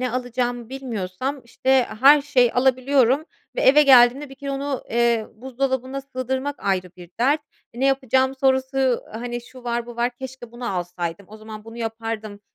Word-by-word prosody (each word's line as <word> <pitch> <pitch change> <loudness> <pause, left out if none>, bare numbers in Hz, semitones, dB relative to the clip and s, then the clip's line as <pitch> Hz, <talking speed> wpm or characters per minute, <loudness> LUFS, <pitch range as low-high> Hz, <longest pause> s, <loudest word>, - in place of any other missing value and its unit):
ne 255 -1 -1
alacağımı 245 -1 -2
bilmiyorsam, 255 0 -4
işte, 260 +2 +2
her 285 +3 +8
şeyi 255 -5 +3
alabiliyorum 260 +2 +3 0.3
ve - - 0
eve 290 +3 +6
geldiğimde 265 +1 +6
bir 270 - -11
kere 280 +1 -6
onu, 275 0 -3
eee, 235 -1 +2
buzdolabına 260 +2 -3
sığdırmak 265 +1 -3
ayrı 185 -2 -1
bir 175 -2 -13
dert. 285 +5 +3 0.3
E, 240 - -9
"Ne 270 - +3
yapacağım?" 265 0 +2
sorusu, 265 -1 +2
hani, 240 +2 -5
şu 250 +1 -15
var, 235 0 -2
bu 240 - -10
var, 240 +1 +1
keşke 260 -2 -9
bunu 240 -4 -4
alsaydım, 175 +1 -4
o 215 - -11
zaman 215 0 -10
bunu 225 +1 -11
yapardım, 225 -2 -5
250 Hz, 165 wpm, -22 LUFS, 230-265 Hz, 0.3 s, her